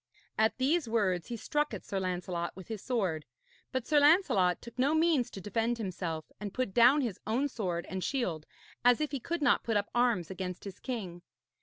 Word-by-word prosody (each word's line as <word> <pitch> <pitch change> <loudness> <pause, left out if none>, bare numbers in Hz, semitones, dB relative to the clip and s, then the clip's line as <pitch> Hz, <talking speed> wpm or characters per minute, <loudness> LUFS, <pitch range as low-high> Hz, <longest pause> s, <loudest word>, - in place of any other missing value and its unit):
At 220 +1 +2
these 280 +1 +1
words 190 -6 +1
he 235 - -4
struck 295 +6 -1
at - - -9
Sir 195 - -2
Lancelot 180 -2 -3
with 190 +2 -11
his 220 -3 -4
sword; 190 -11 -1 0.5
but 260 -2 -2
Sir 300 -2 +4
Lancelot 285 - +4
took 235 +1 -12
no 280 +5 +3
means 315 -6 +3
to - - -8
defend 225 +5 -1
himself, 175 -6 -4
and 205 -1 -6
put 255 -7 -1
down 245 +6 +6
his 230 -8 -3
own 250 +6 +1
sword 180 -10 -3
and 190 -1 -4
shield, 180 - -2 0.4
as 245 -1 +5
if 305 -1 -1
he 280 - -2
could 335 +4 -3
not 265 - +4
put 225 -2 +1
up 205 0 -2
arms 235 -8 +2
against 180 -1 -5
his 195 -1 -8
king. 195 -9 -5
225 Hz, 200 wpm, -31 LUFS, 185-260 Hz, 0.5 s, down